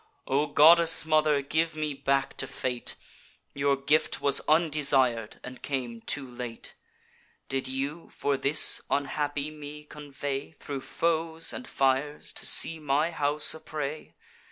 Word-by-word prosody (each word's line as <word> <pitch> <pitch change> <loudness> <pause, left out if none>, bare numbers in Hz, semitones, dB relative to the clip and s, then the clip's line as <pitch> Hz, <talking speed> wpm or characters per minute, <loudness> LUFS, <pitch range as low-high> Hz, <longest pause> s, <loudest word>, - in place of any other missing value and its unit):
O 140 +3 0
goddess 165 +3 +5
mother, 155 -2 +2
give 160 +3 -1
me 155 -1 -3
back 135 0 -1
to 135 - -3
Fate; 125 -2 -4 0.6
Your 140 0 +1
gift 150 +3 0
was 140 -1 +3
undesir'd, 140 -8 +2
and 125 0 -10
came 125 -5 -4
too 135 +2 -3
late! 120 -2 -8 0.8
Did 135 -1 -2
you, 140 +5 -5
for 145 - -1
this, 140 +2 +6
unhappy 145 +1 -2
me 150 0 -10
convey 145 -1 -7
Thro' 140 -3 -7
foes 165 +1 -1
and 255 - -7
fires, 135 +2 -1
to - - 0
see 165 0 +4
my 150 +2 0
house 150 -1 +2
a 160 - -10
prey? 150 -1 -6
145 Hz, 135 wpm, -27 LUFS, 135-155 Hz, 0.8 s, this